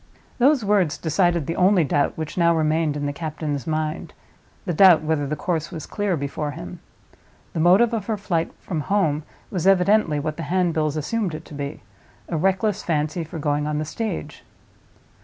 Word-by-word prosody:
Those 265 -2 +4
words 195 -7 +2
decided 170 0 +1
the 165 - -3
only 185 -1 +4
doubt 145 0 0
which 160 -1 -5
now 170 -1 +3
remained 155 -1 +1
in 145 - -3
the 145 - -2
captain's 150 -3 -4
mind—the 155 +2 -5
doubt 175 -2 +7
whether 155 -2 0
the 150 - -2
course 160 0 -2
was 155 - -7
clear 205 -5 -1
before 140 +1 -3
him. 170 +3 -8 0.7
The 170 - -2
motive 190 +8 +5
of 215 -4 -2
her 220 -2 -1
flight 170 -5 -1
from 165 -5 -3
home 160 -4 +1 0.3
was 185 -2 -1
evidently 195 -4 +4
what 150 +1 -3
the - - -4
handbills 160 -4 +1
assumed 185 +2 -2
it 155 - -9
to - - -13
be—a 140 - -8
reckless 195 +5 +1
fancy 155 +1 -1
for 160 +1 -8
going 145 -1 0
on 150 0 -1
the 155 - -2
stage. 220 +8 -5
160 Hz, 175 wpm, -23 LUFS, 150-185 Hz, 0.7 s, doubt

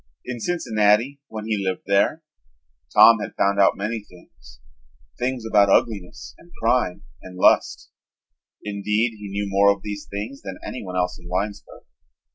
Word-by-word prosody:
In 125 -1 -5
Cincinnati, 115 -3 +1
when 110 -1 -7
he 105 -3 -1
lived 95 -1 -2
there, 100 +11 +1 0.7
Tom 115 -1 +8
had - - -6
found 100 0 +2
out 100 - +4
many 105 +2 -3
things, 85 -10 -18 0.6
things 125 -2 -2
about 105 -3 +4
ugliness 100 -3 0
and 170 - -19
crime 115 -5 0 0.2
and 90 0 -11
lust. - - +2 0.7
Indeed, 105 +3 -1
he 105 -1 -8
knew 100 +1 -3
more 100 +1 +4
of 100 -1 -4
these 105 -1 -6
things 105 +7 -6
than 95 -1 -7
anyone 95 -7 -6
else 90 0 -1
in 85 0 -13
Winesburg. 100 +3 -4
105 Hz, 150 wpm, -22 LUFS, 100-115 Hz, 0.7 s, Tom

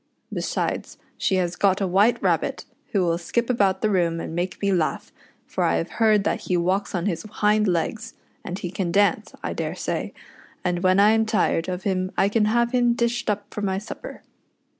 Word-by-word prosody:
Besides, - - -2 0.2
she 190 - 0
has 180 -1 0
got 195 -1 +2
a 195 - +1
White 200 +6 +3
Rabbit, - - 0 0.3
who 200 -4 +2
will 170 -1 +1
skip 235 +7 -1
about 195 -5 +2
the 215 - +3
room 170 -3 +1
and 160 - -5
make 180 +2 -3
me 200 -1 +1
laugh, 170 -5 -1 0.3
for - - -2
I 85 - +2
have 80 - -2
heard 215 -2 +5
that - - 0
he 180 - -1
walks 185 +4 0
on 175 0 -1
his 180 -6 -1
hind 210 0 +1
legs, 185 +6 -2 0.3
and 180 - -5
he 175 -3 -5
can 180 -2 -2
dance, 205 +3 +2
I - - -2
daresay; - - -3 0.5
and 180 -1 0
when 185 +1 +4
I 205 +2 +6
am 225 0 +2
tired 205 -6 +1
of 180 0 -4
him 185 -1 -1
I 195 - +3
can 210 0 +2
have 235 +2 +2
him 245 -2 +3
dished 235 0 -1
up 205 -1 -3
for 210 - -4
my 190 -2 0
supper. 220 - -8
195 Hz, 205 wpm, -24 LUFS, 180-215 Hz, 0.5 s, I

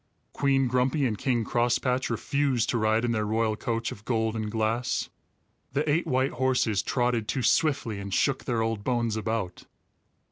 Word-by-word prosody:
Queen 135 -1 +2
Grumpy 130 +3 +1
and 115 -4 0
King 120 +1 0
Crosspatch 125 +2 +1
refused 130 +1 0
to 120 - +1
ride 110 +2 +2
in 120 - 0
their 110 -2 0
royal 110 +1 0
coach 115 +1 -2
of 105 - -10
gold 110 -2 0
and 110 -1 -2
glass. 110 +2 -1 0.6
The 145 +3 0
eight 155 +4 +1
white 130 +1 +1
horses 125 -5 +1
trotted 120 -1 0
too 130 - -1
swiftly 125 -7 +1
and 100 0 -6
shook 135 +7 +1
their 115 -3 0
old 115 -2 -2
bones 120 -2 0
about. 110 -5 -3
115 Hz, 170 wpm, -27 LUFS, 110-130 Hz, 0.6 s, Queen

